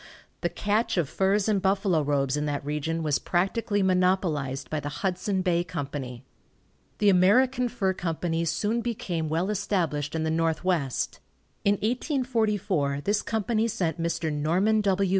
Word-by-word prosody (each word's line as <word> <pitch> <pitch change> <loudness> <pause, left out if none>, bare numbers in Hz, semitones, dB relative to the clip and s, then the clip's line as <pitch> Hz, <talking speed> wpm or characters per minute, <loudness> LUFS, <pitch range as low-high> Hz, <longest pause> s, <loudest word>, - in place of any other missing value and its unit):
The - - +1
catch 210 +1 0
of 170 -5 +2
furs 195 +6 +1
and 205 -3 +2
buffalo 190 -3 +2
robes 140 -2 +1
in 150 0 -1
that 145 -1 -3
region 150 +3 -2
was 150 -2 +1
practically 200 +3 0
monopolized 180 -8 +1
by 155 - -2
the 145 - -4
Hudson 185 +5 -1
Bay 175 -2 +2
Company. 140 -7 -5 0.7
The 205 - +4
American 245 +7 +4
Fur 195 -6 0
Company 165 -1 -2
soon 205 +9 0
became 180 -9 -3
well 170 +6 0
established 165 -8 -1
in 160 - 0
the 160 - 0
Northwest. 165 -3 0 0.4
In 200 - +4
1844 210 - 0
this 205 +6 +1
company 220 +1 0
sent 180 -7 -2
Mr. 165 -2 -1
Norman 180 +9 +2
W. 195 -1 +2
180 Hz, 145 wpm, -27 LUFS, 155-205 Hz, 0.7 s, The